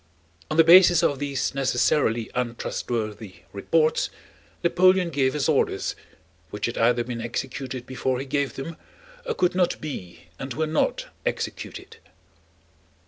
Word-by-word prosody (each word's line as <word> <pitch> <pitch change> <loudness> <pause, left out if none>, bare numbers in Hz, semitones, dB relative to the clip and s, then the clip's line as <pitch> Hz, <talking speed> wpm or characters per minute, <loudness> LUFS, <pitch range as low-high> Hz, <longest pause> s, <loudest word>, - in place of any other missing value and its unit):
On 155 - -2
the 165 - +8
basis 175 0 +7
of 145 -4 +1
these 140 -3 -2
necessarily 125 -3 +1
untrustworthy 115 -4 -4
reports 155 +10 +1 0.5
Napoleon 180 0 +4
gave 135 -3 +1
his 145 - 0
orders, - - +1 0.5
which 105 - -3
had 120 - -3
either 120 +1 +3
been 120 -1 -5
executed 130 +1 -4
before 130 0 -2
he 135 - -4
gave 140 0 -1
them 155 +4 -6 0.5
or 470 - -1
could 180 - +2
not 180 -1 +1
be 90 - -7 0.2
and 135 -2 -5
were 160 - 0
not 155 0 0 0.2
executed. - - -5
135 Hz, 135 wpm, -25 LUFS, 120-155 Hz, 0.5 s, the